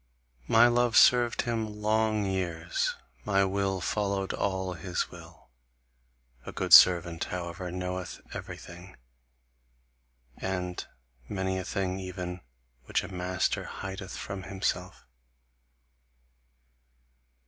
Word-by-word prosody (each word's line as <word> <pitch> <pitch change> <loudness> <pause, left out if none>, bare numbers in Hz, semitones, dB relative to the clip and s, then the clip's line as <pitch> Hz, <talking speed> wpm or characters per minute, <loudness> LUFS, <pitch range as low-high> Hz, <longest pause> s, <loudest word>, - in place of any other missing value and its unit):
My 115 +1 +6
love 120 -1 +3
served 120 -1 +5
him 110 -3 -3
long 110 0 +1
years, 85 -3 -1 0.3
my 100 -1 +3
will 95 0 0
followed 100 -1 -1
all 95 -2 -1
his 90 +1 -3
will. - - -14 0.9
A - - -7
good - - -1
servant, 85 -2 +7
however, 90 0 -5
knoweth 90 0 -4
everything, 90 +2 -9 1.4
and 90 -2 -3 0.5
many 95 -1 -1
a - - -4
thing 95 -1 -2
even 90 -1 -5 0.4
which - - 0
a - - -8
master 90 0 -1
hideth 95 0 -6
from 100 -1 -5
himself. 95 +1 -3
95 Hz, 100 wpm, -29 LUFS, 90-100 Hz, 1.4 s, servant